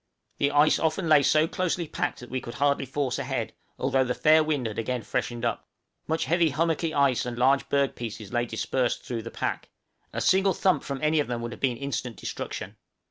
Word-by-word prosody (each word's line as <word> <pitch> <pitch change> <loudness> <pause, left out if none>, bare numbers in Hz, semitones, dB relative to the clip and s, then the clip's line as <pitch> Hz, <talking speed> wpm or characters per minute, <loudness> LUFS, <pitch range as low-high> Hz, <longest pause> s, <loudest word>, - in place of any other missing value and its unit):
The 140 - +3
ice 145 +1 +4
often 165 +2 0
lay 155 -2 +6
so 155 +3 +3
closely 180 -1 -1
packed - - -3
that 120 - -11
we 130 0 -2
could 120 0 -8
hardly 140 0 +1
force 135 -1 -1
ahead, - - -3 0.2
although 135 0 +2
the 125 -1 -2
fair 155 +1 +5
wind 150 -5 -1
had 110 -1 -3
again 120 +1 -2
freshened 120 -1 -2
up. 115 - -2 0.4
Much 160 +1 0
heavy 170 -1 +3
hummocky 165 +2 0
ice 140 -5 +2
and 120 -1 -5
large 135 +3 +3
berg 140 -1 +2
pieces 110 -3 -7
lay 120 0 +1
dispersed 120 +2 -1
through 120 -2 -3
the 115 - -7
pack; - - -3 0.4
a - - -3
single 190 -1 +3
thump 185 -1 +2
from 140 +1 -5
any 155 0 +3
of 145 - 0
them 120 -1 -2
would 120 - -4
have - - -10
been 125 -3 +1
instant 130 -3 -4
destruction. - - -6
140 Hz, 210 wpm, -27 LUFS, 120-155 Hz, 0.4 s, lay